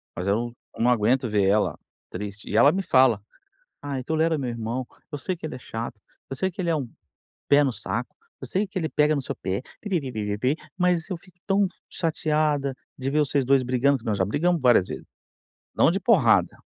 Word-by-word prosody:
mas 90 Hz, +2 st, -4 dB
eu 115 Hz, +4 st, 0 dB, 0.2 s
eu -, -, 0 dB
não 125 Hz, -, +5 dB
aguento 120 Hz, +2 st, +2 dB
ver 105 Hz, -2 st, +2 dB
ela 105 Hz, +2 st, +2 dB, 0.3 s
triste. 105 Hz, +2 st, -7 dB
E -, -, 0 dB
ela 145 Hz, -, +7 dB
me 195 Hz, +2 st, -1 dB
fala: 130 Hz, -, +4 dB, 0.6 s
"Ai, 140 Hz, -2 st, -4 dB
tolera 160 Hz, +2 st, +1 dB
meu 130 Hz, -4 st, -2 dB
irmão, 115 Hz, +2 st, -3 dB, 0.3 s
eu -, -, -2 dB
sei 185 Hz, +6 st, -3 dB
que 160 Hz, -, -6 dB
ele -, -, -6 dB
é -, -, -6 dB
chato, 115 Hz, -2 st, -6 dB, 0.3 s
eu 135 Hz, -, -5 dB
sei 190 Hz, +7 st, 0 dB
que 190 Hz, -, -7 dB
ele 170 Hz, -, 0 dB
é 165 Hz, -, +2 dB
um 135 Hz, -5 st, -3 dB, 0.6 s
pé 145 Hz, +1 st, +6 dB
no 135 Hz, -, +1 dB
saco, 115 Hz, +3 st, -4 dB, 0.3 s
eu -, -, -5 dB
sei 200 Hz, +2 st, 0 dB
que 190 Hz, +1 st, -6 dB
ele 160 Hz, -3 st, -1 dB
pega 150 Hz, +3 st, +3 dB
no 140 Hz, -, -1 dB
seu -, -, -4 dB
pé, 95 Hz, +4 st, -3 dB, 0.2 s
pi-pi-pi-pi-pi-pi, 130 Hz, -, -1 dB, 0.2 s
mas 180 Hz, -1 st, +1 dB
eu 185 Hz, -, -3 dB
fico 180 Hz, +1 st, -22 dB
tão 200 Hz, 0 st, +3 dB, 0.2 s
chateada 150 Hz, -4 st, 0 dB, 0.2 s
de 130 Hz, 0 st, -2 dB
ver 150 Hz, +2 st, +1 dB
vocês 140 Hz, -2 st, +1 dB
2 135 Hz, 0 st, +4 dB
brigando", 130 Hz, +3 st, +2 dB
que -, -, -17 dB
nós 105 Hz, -2 st, 0 dB
já 95 Hz, -, +2 dB
brigamos 165 Hz, -, +1 dB
várias 120 Hz, -7 st, +5 dB
vezes. -, -, -7 dB, 0.7 s
Não -, -, +5 dB
de 190 Hz, -, -1 dB
porrada. 130 Hz, -, +4 dB
135 Hz, 210 wpm, -25 LUFS, 115-160 Hz, 0.7 s, ela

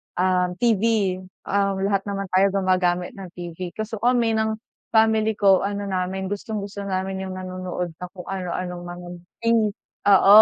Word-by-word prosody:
um, 180 Hz, 0 st, +2 dB
TV. 215 Hz, -3 st, +2 dB, 0.2 s
Um, 200 Hz, 0 st, +1 dB
lahat 200 Hz, 0 st, +1 dB
naman 195 Hz, -1 st, -2 dB
tayo 195 Hz, +1 st, +4 dB
gumagamit 180 Hz, -2 st, +2 dB
ng 190 Hz, -, -6 dB
TV. 175 Hz, 0 st, -6 dB
Kaso 215 Hz, 0 st, -4 dB
kami 240 Hz, -1 st, +3 dB
ng 220 Hz, 0 st, +1 dB, 0.4 s
family 220 Hz, -1 st, +4 dB
ko 195 Hz, -3 st, +5 dB
ano 200 Hz, +1 st, -2 dB
namin, 190 Hz, 0 st, -2 dB
gustong-gusto 205 Hz, -1 st, -4 dB
namin 190 Hz, 0 st, -2 dB
yung 185 Hz, -, -5 dB
nanonood 185 Hz, -1 st, -4 dB
ng 180 Hz, 0 st, -6 dB
kung 180 Hz, -, -7 dB
ano-anong 180 Hz, -1 st, -3 dB
mga 175 Hz, 0 st, -8 dB, 1.0 s
oo, 200 Hz, +1 st, +9 dB
195 Hz, 145 wpm, -24 LUFS, 185-205 Hz, 1.0 s, oo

